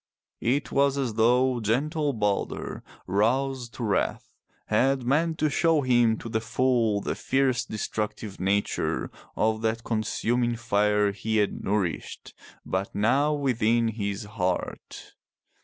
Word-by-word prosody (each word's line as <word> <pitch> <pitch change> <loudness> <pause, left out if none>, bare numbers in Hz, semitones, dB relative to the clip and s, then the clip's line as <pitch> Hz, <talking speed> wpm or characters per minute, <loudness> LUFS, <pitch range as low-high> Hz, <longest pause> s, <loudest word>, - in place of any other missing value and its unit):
It 135 +5 0
was 140 0 +2
as 130 -5 -1
though 125 +3 +3
gentle 145 +7 0
Balder, 105 -5 -2 0.2
roused 120 +5 0
to 120 - -5
wrath, 105 -3 -1 0.3
had 135 0 +2
meant 160 +5 +1
to 155 - +2
show 160 +1 +2
him 120 -4 +3
to 115 - -8
the 110 -1 -1
full 115 -3 +1
the - - -2
fierce 135 -2 +1
destructive 105 -1 -4
nature 100 +2 0 0.2
of 110 0 +1
that 115 +1 -1
consuming 120 +2 0
fire 105 -3 +2
he 110 +2 -2
had 105 -1 0
nourished 100 -4 -2 0.3
but 95 +1 -3
now 135 +9 +2
within 115 -4 +1
his 100 -1 -3
own 105 - -13
heart. 90 -4 -3
115 Hz, 130 wpm, -26 LUFS, 105-130 Hz, 0.3 s, though